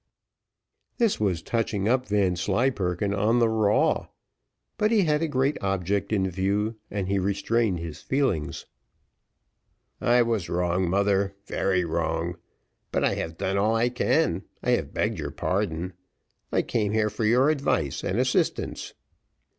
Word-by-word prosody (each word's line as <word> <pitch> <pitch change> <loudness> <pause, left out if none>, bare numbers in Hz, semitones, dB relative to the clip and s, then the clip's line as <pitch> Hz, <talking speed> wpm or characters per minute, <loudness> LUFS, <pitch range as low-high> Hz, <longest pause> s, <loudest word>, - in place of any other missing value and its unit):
This 230 -5 +2
was 95 -6 0
touching 105 -3 -1
up 125 +2 +1
Vanslyperken 100 0 0
on 105 +4 +2
the 120 -1 +4
raw; 110 -2 +2 0.7
but 210 - +3
he 220 -3 +4
had 150 -2 +1
a 165 - +1
great 135 0 0
object 95 +1 -1
in 95 -3 +2
view, 100 +4 -1
and 100 -2 -3
he 100 0 +1
restrained 100 +1 0
his 85 -2 -7
feelings. 130 - -1 1.4
"I 120 0 +4
was 115 -6 -1
wrong, 90 +1 0
mother 100 +1 +1
very 95 -2 0
wrong 80 +1 -2 0.5
but - - 0
I - - +2
have 80 0 -4
done 95 +1 0
all 110 +3 +2
I 115 +2 +2
can, 125 - +1 0.2
I - - +1
have - - 0
begged - - -1
your - - -3
pardon. 90 -2 -2 0.6
I - - +2
came 105 -2 -1
here 110 -1 +1
for - - -4
your 125 +7 +4
advice 110 - -1
and - - -1
assistance." - - -1
100 Hz, 145 wpm, -26 LUFS, 90-115 Hz, 1.4 s, the